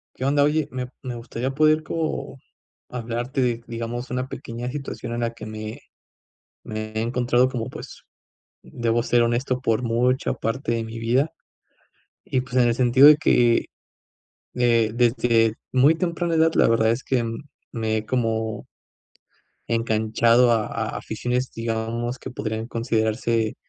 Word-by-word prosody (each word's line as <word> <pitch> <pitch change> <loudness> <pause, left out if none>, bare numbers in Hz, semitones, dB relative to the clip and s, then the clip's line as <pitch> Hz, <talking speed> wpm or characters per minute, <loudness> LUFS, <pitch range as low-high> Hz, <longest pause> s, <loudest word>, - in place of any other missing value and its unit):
Qué 130 - -4
onda, 145 +1 +3
oye, 150 0 +1
me 125 -1 -4 0.2
me 125 -2 -4
gustaría, 120 +2 -4
poder 155 +2 +3
como 155 -3 -3 0.5
hablarte 120 +2 -3
de, 120 -2 0
digamos, 115 +2 -5
una 125 +1 -2
pequeña 120 -1 -6
situación, 135 -3 -5
en 120 - -2
la 115 0 -1
que 115 -2 -9
me 110 0 -7 0.8
me 110 0 -5
he 110 - -1
encontrado, 120 +2 +2
como, 120 -3 -4
pues, - - -10 0.6
debo 120 -1 -1
ser 120 0 +3
honesto, 125 +2 0
por 115 0 +1
mucha 125 +2 +1
parte 115 +1 -2
de 115 -1 -1
mi 110 +1 -7
vida, 125 +7 +1 0.9
y, 130 - 0
pues, 125 0 -9
en 125 -1 +5
el - - +2
sentido, 130 +3 +6
de 150 0 +8
que, 120 -6 +3 0.9
eh, 115 -3 +3
desde 115 -2 +3 0.2
muy 135 +5 +5
temprana 170 0 -1
edad, 160 0 +4
la - - +4
verdad, 110 -1 +3
es 120 +4 -3
que 125 -3 0 0.5
me 110 -2 -1
he 110 - -6
como 110 -3 -1 1.0
enganchado 115 +1 +3
a 110 -2 +2
a - - -3
aficiones, 125 +1 -2
digamos, 115 +2 -3
que - - -7
podrían 110 -1 -4
considerarse, 115 -1 0
120 Hz, 150 wpm, -23 LUFS, 115-130 Hz, 1.0 s, de